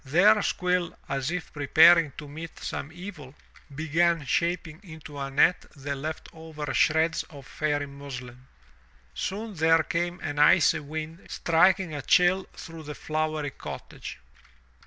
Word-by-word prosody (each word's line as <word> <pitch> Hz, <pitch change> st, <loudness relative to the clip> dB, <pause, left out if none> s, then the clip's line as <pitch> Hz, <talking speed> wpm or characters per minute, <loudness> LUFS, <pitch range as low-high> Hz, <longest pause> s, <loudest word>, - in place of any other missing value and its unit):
There 195 Hz, +10 st, +5 dB
Squill, 180 Hz, -2 st, 0 dB
as 135 Hz, +1 st, -2 dB
if 175 Hz, -1 st, -5 dB
preparing 160 Hz, +2 st, +6 dB
to 150 Hz, -, -8 dB
meet 160 Hz, +3 st, -9 dB
some 150 Hz, -, -5 dB
evil, 170 Hz, -6 st, -10 dB, 0.4 s
began 160 Hz, +1 st, +1 dB
shaping 170 Hz, +2 st, -1 dB
into 155 Hz, -6 st, -10 dB
a 135 Hz, 0 st, -3 dB
net 145 Hz, +6 st, +3 dB
the 140 Hz, 0 st, -4 dB
left 155 Hz, +3 st, -5 dB
over 160 Hz, -3 st, -6 dB
shreds 160 Hz, +1 st, +2 dB
of 140 Hz, -5 st, -12 dB
Fairy 145 Hz, -1 st, -1 dB
muslin. 130 Hz, -3 st, -9 dB, 0.7 s
Soon 210 Hz, +3 st, -4 dB
there 160 Hz, -1 st, +3 dB
came 175 Hz, +2 st, -2 dB
an 145 Hz, 0 st, -4 dB
icy 155 Hz, +1 st, +5 dB
wind 155 Hz, +3 st, -7 dB
striking 175 Hz, +1 st, +2 dB
a 145 Hz, -, -4 dB
chill 180 Hz, +6 st, +3 dB
through 165 Hz, -1 st, -10 dB
the 150 Hz, -1 st, -8 dB
flowery 155 Hz, -1 st, -2 dB
cottage. -, -, -8 dB
160 Hz, 135 wpm, -27 LUFS, 145-170 Hz, 0.7 s, preparing